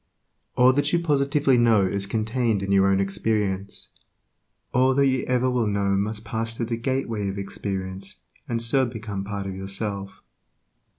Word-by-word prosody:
All 125 +1 +6
that 145 +2 +1
you 175 - +3
positively 145 -4 +2
know 115 -4 +4
is 100 +1 -2
contained 110 -1 0
in 100 - -2
your 95 0 +5
own 95 0 +3
experience; 100 0 -2 0.8
all 130 +1 +3
that 140 0 +4
you 130 -1 +1
ever 125 0 +1
will 125 -3 +1
know 100 -1 0
must 105 +2 -2
pass 115 0 -3
through 115 - -1
the 115 +1 -2
gateway 115 -5 -2
of 95 - -5
experience, 95 -1 -5 0.3
and 115 -1 0
so 130 +3 +3
become 110 -4 -5
part 100 0 -4
of 95 - -4
yourself. 100 +1 -5
110 Hz, 165 wpm, -24 LUFS, 100-125 Hz, 0.8 s, All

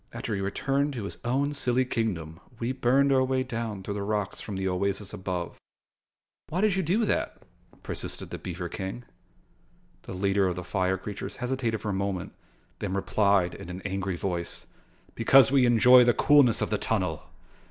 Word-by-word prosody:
After 110 - -4
he 100 - -2
returned 140 +8 0
to 120 -5 -5
his 100 - -7
own 135 +4 0
silly 130 -2 +1
kingdom, 90 -10 -3 0.2
we 120 +2 -2
burned 135 +2 +3
our 130 -1 +4
way 130 0 0
down 115 -5 -4
through 100 - -4
the 100 - -4
rocks 105 -1 -2
from 105 - -6
the 95 0 -2
oasis 95 +2 -2
above." 90 -2 -4 0.9
"Why 180 +4 -1
did 210 -3 +3
you 190 - +1
do 190 +7 +1
that?" - - -1 0.5
persisted - - -4
the - - -5
beaver 90 0 -5
King. 95 +7 -6 1.0
The - - -8
leader 100 +1 +1
of 90 - -1
the 90 - -5
fire 95 +1 0
creatures 100 +1 -6
hesitated 125 -3 -2
for 105 - -3
a - - -1
moment 95 -2 -3 0.5
then 95 -1 -3
replied 100 -2 +2
in 95 -2 -9
an 90 +1 -7
angry 95 -1 -2
voice: 85 -2 -4 0.5
"Because 135 -2 +5
we 135 -3 +4
enjoy 125 +2 +7
the 120 0 +3
coolness 145 -6 +5
of - - -1
the 105 - 0
tunnel. 90 -8 -1
105 Hz, 180 wpm, -27 LUFS, 95-125 Hz, 1.0 s, enjoy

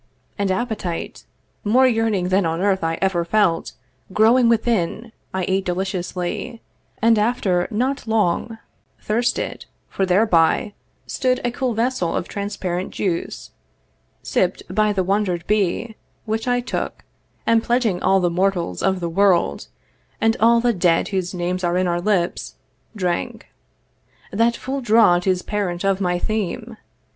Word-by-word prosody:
And 200 -2 -1
appetite 190 -5 -3 0.4
More 245 +5 +4
yearning 225 -7 +1
than 190 +1 +3
on 165 0 -1
earth 190 -1 +1
I 165 0 -1
ever 185 -3 +1
felt 170 -2 +1 0.4
Growing 230 +4 +4
within, 225 -1 0 0.2
I 190 -1 -2
ate 190 +1 +1
deliciously; 185 +4 -3 0.4
And, 225 -1 +5
after 205 -6 +1
not 250 +4 -1
long, 220 +1 0 0.4
thirsted, 235 +3 -2 0.2
for 195 - -1
thereby 185 0 +3 0.3
Stood 255 -1 0
a 240 - +1
cool 245 -1 -2
vessel 230 -6 0
of - - -2
transparent 190 -3 -3
juice 175 -4 -3 0.7
Sipp'd - - 0
by 215 +1 +2
the 195 -2 0
wander'd 185 -3 0
bee, 210 -2 +1
the 220 - -14 0.3
which 220 +2 -2
I 245 0 +2
took, 245 - -4 0.4
And, 230 0 +4
pledging 235 -6 0
all 195 - +3
the 175 -2 +1
mortals 175 - 0
of 190 -1 0
the 170 - -1
world, 175 - +2 0.5
And 225 +1 +2
all 235 +1 +5
the 240 0 +2
dead 175 -3 +2
whose 185 -2 -2
names 180 +1 -2
are 175 0 +1
in 185 - +1
our 175 -1 0
lips, 180 -3 -1 0.4
Drank. 180 - -3 0.8
That 230 +3 +2
full 270 +1 -4
draught 215 -6 +4
is 185 -1 +1
parent 190 -4 -2
of 195 0 +1
my 180 -1 +1
theme. 220 +4 -3
195 Hz, 145 wpm, -21 LUFS, 180-225 Hz, 0.8 s, And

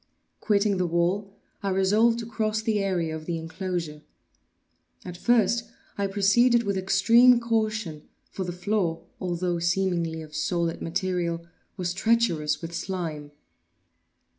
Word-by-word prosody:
Quitting 205 -2 +2
the 180 -1 0
wall, 175 +4 0 0.3
I 200 - -1
resolved 210 +5 +3
to 235 - -5
cross 220 -1 -2
the 215 -2 +1
area 175 -5 -1
of 155 0 -8
the 170 -1 -1
enclosure. 165 -2 -4 1.0
At 180 - -7
first 230 +3 +2 0.3
I 200 0 -1
proceeded 230 +5 +3
with 200 -2 -1
extreme 230 +6 +5
caution, 215 -9 -2 0.2
for 190 - -4
the 175 - -4
floor, 180 -2 -1
although 175 -1 -1
seemingly 170 -2 0
of 155 -1 -13
solid 170 +1 -1
material, 170 -1 -2 0.3
was 180 -2 -2
treacherous 175 -8 +1
with 165 0 -6
slime. 165 -4 -4
185 Hz, 130 wpm, -26 LUFS, 170-215 Hz, 1.0 s, extreme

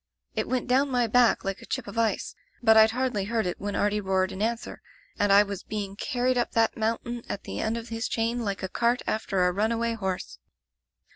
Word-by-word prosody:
It - - -2
went 255 -2 -1
down 265 +3 +3
my 245 -2 +2
back 235 -1 +3
like 195 -1 -3
a - - -11
chip - - -3
of 200 - -9
ice 230 -1 0 0.2
— - - -36
^but 220 0 +7
Pd 220 0 +7
hardly 240 -4 -1
heard 225 0 0
it 180 - -3
when 205 0 -3
Artie 210 0 +1
roared 190 -1 +1
in 190 +1 -6
answer, 230 +2 -2 0.4
and 205 -1 +3
I 200 +1 +8
was 200 -2 -6
be 210 -1 -4
ing 195 0 -8
carried 250 +3 0
up 240 - -1
that 225 -1 +2
mountain 230 +2 -2
at - - -4
the - - -5
end 220 +1 -1
of 230 0 -7
his 225 0 -2
chain 230 +1 -1
like 200 -2 -3
a - - -1
cart 235 +6 0
after 195 -4 0
a 180 - +3
runaway 230 +3 0
horse. 190 - -4
220 Hz, 230 wpm, -27 LUFS, 200-235 Hz, 0.4 s, I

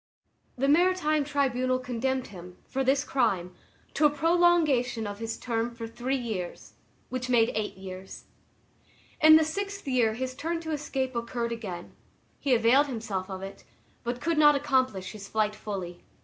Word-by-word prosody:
The 270 +2 +1
maritime 310 -1 +3
tribunal 255 -3 +1
condemned 255 +1 -2
him, 180 -2 -11
for 270 0 -1
this 270 +2 +2
crime, 195 -11 0 0.4
to 300 +1 +5
a - - +1
prolongation 300 -7 +2
of 205 0 -6
his 225 0 -4
term 230 -1 -1
for 230 -1 -6
three 250 +4 -2
years, 215 -8 -5 0.4
which 255 0 -4
made 235 -2 +4
eight 215 -2 -3
years. 190 0 -9 1.0
In 315 0 +9
the 315 0 +5
sixth 400 +3 -4
year 240 -4 +2
his 255 +2 -3
turn 330 +5 -3
to 320 -1 -5
escape 270 -4 -2
occurred 235 0 -2
again; 190 -7 -6 0.4
he 270 -3 +2
availed 245 +5 +4
himself 220 -7 -4
of 190 0 -6
it, 195 0 -9 0.4
but 240 0 -3
could 335 -2 +1
not 295 -1 +7
accomplish 260 -9 0
his 200 -2 -9
flight 215 0 0
fully. 185 -5 -6
250 Hz, 160 wpm, -28 LUFS, 220-285 Hz, 1.0 s, In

